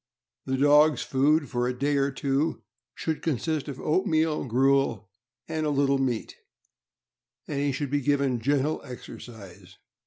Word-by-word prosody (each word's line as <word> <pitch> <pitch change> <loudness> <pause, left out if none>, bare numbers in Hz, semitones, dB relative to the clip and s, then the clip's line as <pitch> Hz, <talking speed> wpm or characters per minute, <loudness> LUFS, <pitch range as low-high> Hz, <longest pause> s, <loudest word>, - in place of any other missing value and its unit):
The 130 0 0
dog's 150 +2 +5
food, 145 +3 +2
for 120 -1 -1
a 125 0 -3
day 145 +3 +1
or 140 0 +2
two, 140 +3 -1 0.3
should 160 -2 -3
consist 155 0 -1
of 140 -3 -6
oatmeal 160 -2 +1
gruel 125 -5 +1 0.4
and 160 -1 -2
a 150 - 0
little 140 -1 +2
meat, 125 -4 -2 1.1
and 140 - -3
he 140 0 +1
should 135 0 -3
be 145 0 +1
given 140 -3 +1
gentle 145 +5 0
exercise. 100 -7 -11
140 Hz, 145 wpm, -26 LUFS, 125-150 Hz, 1.1 s, dog's